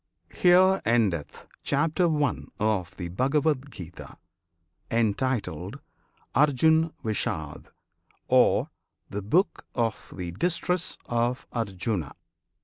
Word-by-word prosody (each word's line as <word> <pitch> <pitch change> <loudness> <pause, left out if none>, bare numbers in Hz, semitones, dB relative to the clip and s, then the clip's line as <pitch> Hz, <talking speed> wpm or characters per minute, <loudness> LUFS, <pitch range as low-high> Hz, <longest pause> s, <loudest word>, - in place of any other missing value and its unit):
HERE 185 +2 +5
ENDETH 105 -10 0 0.2
CHAPTER 165 +4 +1
I. 130 - +2 0.3
OF 95 -5 0
THE 90 -2 -4
BHAGAVAD 140 - +1
GITA, 85 - -10 0.7
Entitled 115 - -1 0.5
"Arjun 160 +3 +4
Vishad," 80 -8 -3 0.6
Or - - +4 0.4
"The 100 - -3
Book 165 - +1
of 115 -3 -2
the 90 -2 -4
Distress 180 - -1
of 120 +1 -1
Arjuna." 100 - -2
115 Hz, 90 wpm, -27 LUFS, 95-155 Hz, 0.7 s, HERE